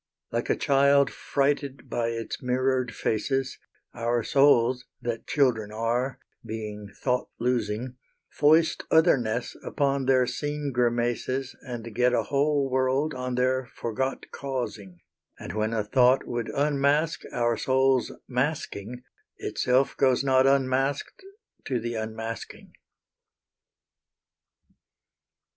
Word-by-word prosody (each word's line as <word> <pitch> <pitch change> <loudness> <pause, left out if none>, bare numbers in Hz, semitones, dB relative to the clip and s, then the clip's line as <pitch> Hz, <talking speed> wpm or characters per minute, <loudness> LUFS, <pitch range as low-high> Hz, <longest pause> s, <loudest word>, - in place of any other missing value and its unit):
Like - - -2
a - - +3
child 140 0 +3
frighted 140 -1 -1
by 120 -1 -1
its 115 -1 -4
mirrored 130 -1 0
faces, 135 +5 -1 0.3
Our 120 0 0
souls, 125 -2 +4
that 120 -2 -4
children 120 -7 +1
are, 120 +4 -1 0.3
being 105 -2 -6 0.2
thought 125 -1 0
losing, 120 0 -1 0.3
Foist 155 +2 +3
otherness 125 -8 +2
upon 140 -2 0
their 130 -1 +4
seen 145 +3 -3
grimaces 120 +2 0
And 120 -3 -7
get 125 +2 +2
a - - +2
whole 145 0 +1
world 130 +3 +1
on 125 -1 -3
their 130 0 +1
forgot 125 +4 -4
causing; 115 -10 -5 0.4
And, - - -7
when 110 +1 -1
a 110 -2 0
thought 125 +4 +3
would 120 -1 -3
unmask 145 +2 +1
our 120 -1 +1
soul's 130 0 +2 0.2
masking, 125 -4 -3 0.3
Itself 130 +2 +1
goes 130 -1 +3
not 130 -1 +4
unmasked 135 - 0 0.4
to 125 -3 -1
the 120 +1 -4
unmasking. 110 0 -6
125 Hz, 110 wpm, -26 LUFS, 120-135 Hz, 0.4 s, souls